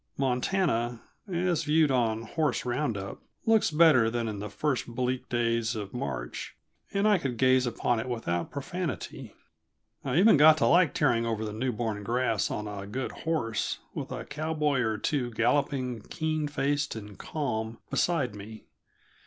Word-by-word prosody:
Montana, 125 Hz, -3 st, 0 dB, 0.3 s
as 175 Hz, -2 st, +1 dB
viewed 155 Hz, -1 st, +3 dB
on 115 Hz, -3 st, +1 dB
"horse 145 Hz, +2 st, -1 dB
round 125 Hz, -2 st, -1 dB
up," 95 Hz, 0 st, -7 dB, 0.2 s
looks 225 Hz, -1 st, +4 dB
better 150 Hz, -7 st, +5 dB
than 115 Hz, 0 st, -2 dB
in 105 Hz, -2 st, -4 dB
the 105 Hz, +1 st, -5 dB
first 140 Hz, +5 st, -1 dB
bleak 125 Hz, +1 st, -2 dB
days 115 Hz, -1 st, 0 dB
of 100 Hz, -2 st, -5 dB
March, -, -, -5 dB, 0.4 s
and 200 Hz, +1 st, +2 dB
I 205 Hz, -3 st, +4 dB
could 130 Hz, -6 st, -3 dB
gaze 130 Hz, 0 st, +4 dB
upon 120 Hz, 0 st, 0 dB
it 125 Hz, -, -4 dB
without 85 Hz, -8 st, -2 dB
profanity. 175 Hz, +5 st, -5 dB, 0.7 s
I 135 Hz, +1 st, -1 dB
even 195 Hz, -1 st, +7 dB
got 155 Hz, +2 st, +8 dB
to -, -, +2 dB
like 175 Hz, -4 st, +4 dB
tearing 115 Hz, -1 st, +2 dB
over 110 Hz, -1 st, -1 dB
the 105 Hz, -, -5 dB
newborn 110 Hz, -2 st, -2 dB
grass 115 Hz, -2 st, 0 dB
on 105 Hz, 0 st, -3 dB
a 100 Hz, -1 st, -6 dB
good 130 Hz, +6 st, -3 dB
horse, 140 Hz, -10 st, -2 dB, 0.2 s
with -, -, -5 dB
a -, -, -5 dB
cowboy 150 Hz, -2 st, -1 dB
or 110 Hz, -3 st, 0 dB
two 125 Hz, +2 st, -1 dB
galloping, 125 Hz, +1 st, 0 dB
keen 155 Hz, -2 st, -1 dB
faced 145 Hz, -1 st, -1 dB
and 105 Hz, -2 st, -8 dB
calm, 110 Hz, -3 st, -3 dB
beside 145 Hz, -10 st, +1 dB
me. 105 Hz, +2 st, -10 dB
125 Hz, 160 wpm, -28 LUFS, 110-150 Hz, 0.7 s, got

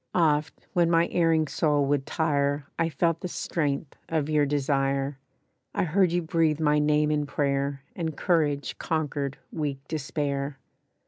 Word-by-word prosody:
Oft 155 Hz, -3 st, +1 dB
when 175 Hz, -3 st, +3 dB
my 170 Hz, 0 st, +4 dB
erring 165 Hz, -2 st, +2 dB
soul 145 Hz, -1 st, +2 dB
would 140 Hz, -1 st, 0 dB
tire 145 Hz, -2 st, 0 dB
I 165 Hz, -, +2 dB
felt 165 Hz, +2 st, +1 dB
the -, -, -3 dB
strength 145 Hz, -4 st, -2 dB
of 155 Hz, -2 st, 0 dB
your 150 Hz, -2 st, +3 dB
desire; 135 Hz, -1 st, 0 dB, 0.6 s
I -, -, +2 dB
heard 180 Hz, +1 st, +3 dB
you 175 Hz, 0 st, +1 dB
breathe 160 Hz, -1 st, +1 dB
my 150 Hz, -1 st, +3 dB
name 150 Hz, 0 st, +3 dB
in 150 Hz, -1 st, 0 dB
prayer, 140 Hz, -1 st, -1 dB
And 160 Hz, -4 st, -3 dB
courage 150 Hz, -5 st, 0 dB
conquered 145 Hz, -3 st, -2 dB
weak 150 Hz, -4 st, -2 dB
despair. 140 Hz, -2 st, -2 dB
150 Hz, 145 wpm, -27 LUFS, 140-165 Hz, 0.6 s, my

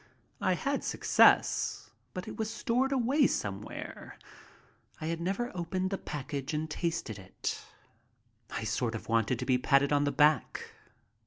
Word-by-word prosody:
I -, -, +3 dB
had -, -, -1 dB
success, -, -, +3 dB, 0.2 s
but 185 Hz, 0 st, -5 dB
it -, -, -6 dB
was 220 Hz, 0 st, -2 dB
stored 250 Hz, +4 st, 0 dB
away 270 Hz, +2 st, +3 dB
somewhere. 100 Hz, 0 st, -5 dB, 0.8 s
I -, -, -5 dB
had 165 Hz, +1 st, -2 dB
never 195 Hz, +6 st, -2 dB
opened 185 Hz, +2 st, -2 dB
the 195 Hz, -, -2 dB
package 145 Hz, 0 st, -4 dB
and 155 Hz, +1 st, -1 dB
tasted 160 Hz, -, -3 dB
it. 95 Hz, 0 st, -5 dB, 0.9 s
I -, -, -4 dB
sort 115 Hz, +1 st, -1 dB
of 110 Hz, -, -7 dB
wanted 115 Hz, +2 st, +2 dB
to -, -, -4 dB
be 130 Hz, -2 st, +3 dB
patted 140 Hz, +2 st, +3 dB
on 145 Hz, 0 st, +3 dB
the 145 Hz, -, +1 dB
back. 150 Hz, +1 st, +2 dB
155 Hz, 150 wpm, -31 LUFS, 130-190 Hz, 0.9 s, I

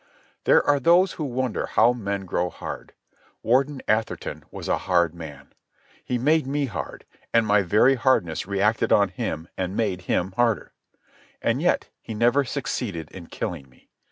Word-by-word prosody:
There -, -, +5 dB
are 145 Hz, -1 st, +4 dB
those 175 Hz, +6 st, +4 dB
who 155 Hz, -, -5 dB
wonder 130 Hz, -3 st, -2 dB
how 120 Hz, +2 st, +4 dB
men 100 Hz, -4 st, -3 dB
grow 90 Hz, 0 st, -1 dB
hard. -, -, -8 dB, 0.5 s
Warden 130 Hz, +4 st, +1 dB
Atherton 110 Hz, +1 st, -1 dB
was -, -, -8 dB
a -, -, +1 dB
hard 85 Hz, -3 st, +3 dB
man. 80 Hz, -4 st, -10 dB, 0.5 s
He 125 Hz, -, -1 dB
made 150 Hz, +3 st, +2 dB
me 145 Hz, +1 st, 0 dB
hard, 90 Hz, -, -6 dB, 0.3 s
and 115 Hz, -1 st, +3 dB
my 105 Hz, -1 st, +4 dB
very 105 Hz, +8 st, +4 dB
hardness 115 Hz, -11 st, +1 dB
reacted 100 Hz, +3 st, +1 dB
on 100 Hz, -1 st, +5 dB
him 85 Hz, -3 st, -4 dB
and 95 Hz, +1 st, -2 dB
made 100 Hz, -5 st, 0 dB
him 95 Hz, +2 st, +1 dB
harder. 115 Hz, +1 st, 0 dB, 0.7 s
And -, -, 0 dB
yet -, -, +1 dB
he 110 Hz, -, -7 dB
never 120 Hz, +6 st, +3 dB
succeeded 115 Hz, -, -4 dB
in 85 Hz, -3 st, -10 dB
killing 70 Hz, -7 st, -5 dB
me. 65 Hz, -, -26 dB
110 Hz, 160 wpm, -24 LUFS, 90-130 Hz, 0.7 s, There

